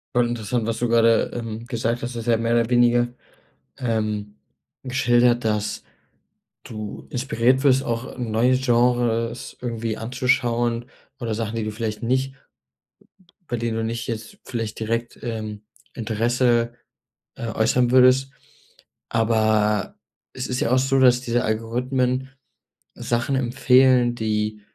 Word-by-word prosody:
Voll 120 -1 +3
interessant, 115 -1 -2
was 115 - -1
du 120 - 0
grade, 115 -1 +3
ähm, 115 -1 -5
gesagt 120 -1 -2
hast, 120 +1 -4
du 120 - -5
hast 115 - -7
ja 115 -1 +4
mehr 115 +1 0
oder 115 -1 +2
weniger, 120 0 +4 0.7
ähm, 110 -4 -2 0.5
geschildert, 120 -2 +2
dass 105 -1 -1 0.8
du 110 -2 -7
inspiriert 130 -1 +1
wirst, 135 -1 +4
auch 120 +2 -4
neue 120 +1 +2
Genres 120 -2 +1
irgendwie 115 -2 -3
anzuschauen 120 -1 0 0.3
oder 115 -4 -2
Sachen, 110 0 -3
die 115 - -1
du 110 - -2
vielleicht 110 -1 -4
nicht 130 +3 0 1.2
bei 120 - -1
denen 115 -1 -2
du 115 - -1
nicht 115 +1 -3
jetzt 110 -2 -6
vielleicht 115 -3 -4
direkt, 115 +1 -3
ähm, 110 -3 -5 0.3
Interesse, 120 +1 +1 0.6
äh, 115 - -5
äußern 115 +2 +2
würdest. 130 +1 +5 0.8
Aber 110 -2 +1 0.4
es 130 - -5
ist 125 0 -2
ja 115 - 0
auch 130 - +5
so, 135 +1 +2
dass 125 -1 +5
diese 120 -1 -1
Algorithmen 125 +4 -1 0.6
Sachen 120 +3 -1
empfehlen, 125 -1 +4
die 110 -2 -2
120 Hz, 135 wpm, -23 LUFS, 115-125 Hz, 1.2 s, würdest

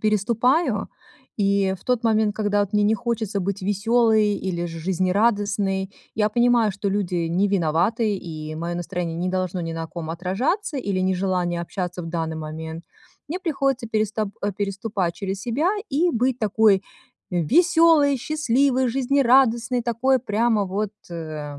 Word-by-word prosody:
переступаю 230 - +1 0.5
и 200 -2 +2
в - - -22
тот 250 -1 0
момент, 220 -2 +2
когда 205 -1 +1
вот 205 0 -1
мне 210 0 +3
не 215 +2 +3
хочется 220 -3 -2
быть 195 +1 -3
веселой 215 +2 +2
или 175 -3 -3
же 165 -1 -7
жизнерадостной. 195 +2 0 0.2
Я 210 -1 +2
понимаю, 240 -1 +3
что 200 +1 -3
люди 180 -4 -1
не 185 +5 +1
виноваты, 200 +5 +1
и 155 -4 -7
мое 170 +2 -4
настроение 175 -1 -3
не 180 +2 -1
должно 185 -1 -2
ни 165 -1 -4
на 165 0 -4
ком 160 -1 -6
отражаться 230 - -1
или 200 -7 -1
нежелание 185 -2 0
общаться 180 0 -4
в - - -7
данный 165 -1 -3
момент. 160 +1 -6 0.4
Мне 350 +5 -4
приходится 275 -8 -1
переста 215 -1 -1
э, 205 0 0
переступать 200 -2 -2
через 195 -1 -4
себя 245 - 0 0.2
и 325 +6 +2
быть 250 -1 0
такой 210 -2 +3 0.5
веселой, 300 - +4
счастливой, 260 -2 +1
жизнерадостной, 250 -2 +3
такой 245 +3 +2
прямо 220 -1 +1
вот, 200 +2 -3 0.2
э, 155 -3 -6
205 Hz, 145 wpm, -23 LUFS, 180-235 Hz, 0.5 s, веселой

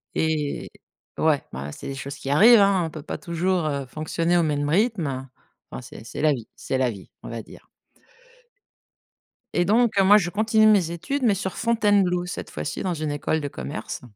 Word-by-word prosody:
Et 155 -2 -1 0.5
ouais, 155 -3 +2
ben, 70 +3 -6
c'est - - -9
des 135 - -5
choses 135 +1 -6
qui 135 - -6
arrivent, 215 +11 +7
hein! 195 -3 +3
On - - -4
peut 155 - -8
pas 145 - -5
toujours, 175 0 -1
heu, 140 -2 -2
fonctionner 165 +5 -1
au 170 - +3
même 145 -2 0
rythme. 165 - 0 0.4
Enfin 65 - -6
c'est - - -11
c'est - - -6
la 155 -1 +4
vie 120 -5 -7
c'est 130 - -3
la 130 -2 +1
vie, 100 -4 -12
on - - -7
va 115 -1 -5
dire. - - -16 1.9
Et 175 - +3
donc, 220 +1 +3
heu, - - +6
moi 205 +2 +7
je 175 -4 -1
continue 215 +1 +3
mes 200 -6 +4
études, 175 +12 -3
mais 220 -5 +4
sur 190 -1 -4
Fontainebleau, 205 -6 +2
cette 180 - -6
fois-ci, - - -5
dans 180 -2 -1
une 155 -1 -3
école 145 +2 -1
de 145 - -4
commerce. 70 - -6
165 Hz, 200 wpm, -24 LUFS, 145-200 Hz, 1.9 s, arrivent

